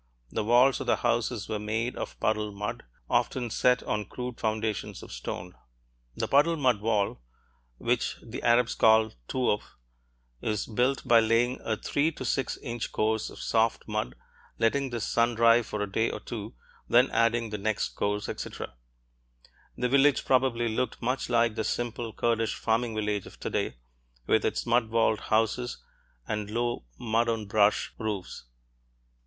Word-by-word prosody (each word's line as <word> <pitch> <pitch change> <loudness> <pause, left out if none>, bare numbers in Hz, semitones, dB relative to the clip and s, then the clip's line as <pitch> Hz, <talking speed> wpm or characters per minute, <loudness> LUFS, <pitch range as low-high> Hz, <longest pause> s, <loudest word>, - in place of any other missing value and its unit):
The 110 - -1
walls 125 +4 +5
of - - -5
the - - +4
houses 120 -2 0
were 105 - -2
made 110 +3 -2
of - - -6
puddled 105 -1 0
mud, 105 +1 -4 0.2
often 120 -3 0
set 125 +2 +3
on 105 -1 -2
crude 125 +2 -6
foundations 110 -1 -2
of - - -11
stone. 90 +9 -6 0.6
(The - - -2
puddled 150 +4 +4
mud 125 -7 +2
wall, 105 - 0 0.6
which - - 0
the - - -7
Arabs 120 0 +3
call 110 0 +5 0.2
touf, 125 -5 +1 0.8
is 105 -1 -1
built 125 +5 0
by 115 -1 +7
laying 115 +3 +2
a 110 -1 -1
three 145 +8 0
to - - -6
six 135 - -1
inch 120 -2 -4
course 110 0 0
of - - -12
soft 115 0 +1
mud, 60 - -2 0.4
letting 135 +4 +1
this 120 -3 -3
sun 115 0 +2
dry 115 +1 +6
for 105 -2 -3
a 100 - -5
day 110 +3 +1
or - - -5
two, 110 -1 -7 0.3
then 125 +3 +5
adding 115 0 +2
the 105 - -3
next 110 +1 0
course, 105 0 -2
etc.) - - -6 1.0
The 125 - +1
village 140 +2 +4
probably 125 -2 +2
looked 125 +3 -2
much 125 +2 -1
like 115 -1 +3
the 110 - -2
simple 120 0 -2
Kurdish 115 0 0
farming 115 0 0
village 105 -2 -1
of - - -14
today, - - -2 0.5
with - - +2
its - - -1
mud 115 -1 +2
walled 115 -1 +2
houses 115 +3 0 0.5
and 105 -1 -3
low 120 - -2
mud 115 +1 +1
on 110 -2 -1
brush 105 0 +2
roofs. 105 - -4
115 Hz, 160 wpm, -28 LUFS, 110-120 Hz, 1.0 s, by